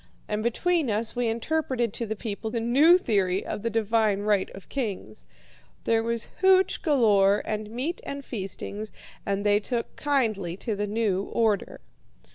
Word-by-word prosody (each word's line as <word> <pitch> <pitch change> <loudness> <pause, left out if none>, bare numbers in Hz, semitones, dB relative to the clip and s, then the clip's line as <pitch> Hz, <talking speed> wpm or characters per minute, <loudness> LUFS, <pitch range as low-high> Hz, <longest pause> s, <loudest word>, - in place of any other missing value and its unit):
And 210 0 -2
between 310 +6 +1
us 220 +2 -1
we 245 -1 0
interpreted 240 -1 -1
to 230 - -4
the 220 - -3
people 220 0 -5
the 230 +1 -2
new 280 +10 +5
theory 195 - 0
of - - -4
the 230 - -1
divine 220 -2 +1
right 205 -2 +1
of 195 - -12
kings. 200 - -5 0.6
There 225 0 +2
was 230 0 -1
hooch 380 0 +4
galore, 210 - +3
and 215 0 -3
meat 260 +10 -3
and 280 0 -6
feastings, 210 0 -6 0.4
and 200 +1 -1
they 205 0 +4
took 235 +2 -3
kindly 215 - 0
to 220 0 -3
the 205 +1 -2
new 205 -3 0
order. 220 -4 0
225 Hz, 160 wpm, -26 LUFS, 205-245 Hz, 0.6 s, new